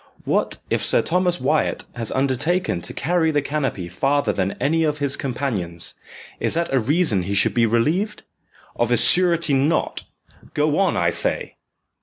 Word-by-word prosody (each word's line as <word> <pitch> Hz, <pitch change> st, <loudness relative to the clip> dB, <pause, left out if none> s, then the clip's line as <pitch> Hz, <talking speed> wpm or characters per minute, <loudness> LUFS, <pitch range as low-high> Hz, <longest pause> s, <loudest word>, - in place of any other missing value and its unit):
"What -, -, 0 dB
if -, -, 0 dB
Sir -, -, +4 dB
Thomas 180 Hz, 0 st, 0 dB
Wyat 155 Hz, -, 0 dB
has 115 Hz, -3 st, -3 dB
undertaken 140 Hz, -, 0 dB
to -, -, -5 dB
carry 165 Hz, +2 st, 0 dB
the 150 Hz, -2 st, +1 dB
canopy 135 Hz, -, -3 dB
farther 135 Hz, +6 st, 0 dB
than 95 Hz, 0 st, -1 dB
any 160 Hz, +3 st, 0 dB
of 150 Hz, -1 st, 0 dB
his 140 Hz, -2 st, -1 dB
companions, 110 Hz, -11 st, -3 dB, 0.5 s
is -, -, 0 dB
that 170 Hz, -3 st, -1 dB
a 135 Hz, -, +4 dB
reason 135 Hz, -, +1 dB
he 100 Hz, +3 st, -3 dB
should 100 Hz, -, +2 dB
be 115 Hz, -1 st, +3 dB
relieved? 165 Hz, -, 0 dB, 0.5 s
Of 120 Hz, -, 0 dB
a 120 Hz, -, +4 dB
surety 170 Hz, +2 st, +4 dB
not 140 Hz, +4 st, 0 dB, 0.5 s
go 150 Hz, +2 st, +1 dB
on, 195 Hz, -2 st, +2 dB
I 85 Hz, -1 st, +2 dB
say!" -, -, -2 dB
140 Hz, 165 wpm, -21 LUFS, 115-165 Hz, 0.5 s, Sir